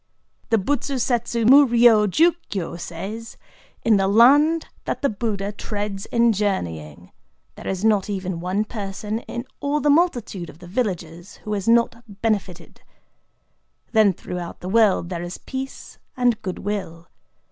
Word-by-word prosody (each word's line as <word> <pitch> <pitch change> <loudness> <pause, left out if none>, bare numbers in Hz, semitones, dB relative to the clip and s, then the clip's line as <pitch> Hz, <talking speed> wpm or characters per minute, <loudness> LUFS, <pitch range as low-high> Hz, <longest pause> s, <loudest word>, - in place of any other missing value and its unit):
The 225 - +4
BUTSU 275 +6 -1
SETSU 235 -2 0
MU 280 +3 +9
RYO 230 -3 +5
JU 330 - +4 0.2
KYO 185 -5 -4
says:—"In 210 +5 -4
the 195 0 +2
land 285 +10 +5 0.2
that - - -3
the 280 - +3
Buddha 205 -2 -3
treads 205 -1 -5
in 235 -1 +3
journeying, 85 - -3 0.4
there - - -10
is 190 +2 -2
not 210 -2 +2
even 190 -3 -3
one 185 +5 -1
person 210 0 -4
in 240 +1 -7
all 285 +1 0
the 290 +1 +3
multitude 245 - 0
of 150 - -13
the 175 - -13
villages 175 -4 -4
who 210 - -2
is 200 -1 -3
not 235 0 +3 0.2
benefited. 195 -6 -3 1.1
Then 220 -3 +5
throughout 180 -1 -7
the 180 - -5
world 205 -5 +3
there 175 -2 -4
is 175 +1 -6
peace 265 0 -7 0.2
and 245 -3 +2
good 185 -3 -4
will. 185 -5 -5
210 Hz, 145 wpm, -22 LUFS, 185-235 Hz, 1.1 s, MU